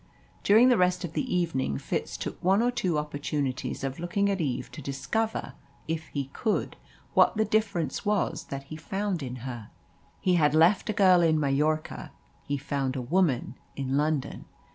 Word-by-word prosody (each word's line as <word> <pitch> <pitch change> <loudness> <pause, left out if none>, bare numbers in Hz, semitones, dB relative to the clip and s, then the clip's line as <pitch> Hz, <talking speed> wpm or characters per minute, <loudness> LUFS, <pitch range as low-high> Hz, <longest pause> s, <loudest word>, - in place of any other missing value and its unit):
During 225 +5 +6
the 245 - +4
rest 180 0 +2
of 170 -2 -5
the 260 +5 -2
evening 165 - 0
Fitz - - -3
took - - -6
one 195 +5 +4
or 245 - +2
two 180 -9 0
opportunities 145 -3 -3
of 135 +1 -3
looking 200 +4 0
at 195 -2 -1
Eve 130 -4 -2
to 155 - -8
discover, 140 - -2 0.3
if 160 0 -3
he 140 -2 -4
could, 220 -3 -1 0.4
what - - +4
the 220 - +3
difference 205 -5 0
was 205 -5 0
that 140 -3 -6
he 145 +3 -9
found 195 +1 -2
in 125 -2 -5
her. 120 -5 -6 0.5
He 185 - +2
had 150 0 +3
left 175 +7 +4
a - - +1
girl 185 -3 +5
in 160 -2 +3
Majorca 150 +2 0 0.3
he 145 - -2
found 140 -1 -2
a 130 - -2
woman 155 -2 +1 0.2
in 135 -1 -2
London. 150 -1 -1
160 Hz, 175 wpm, -28 LUFS, 140-190 Hz, 0.5 s, During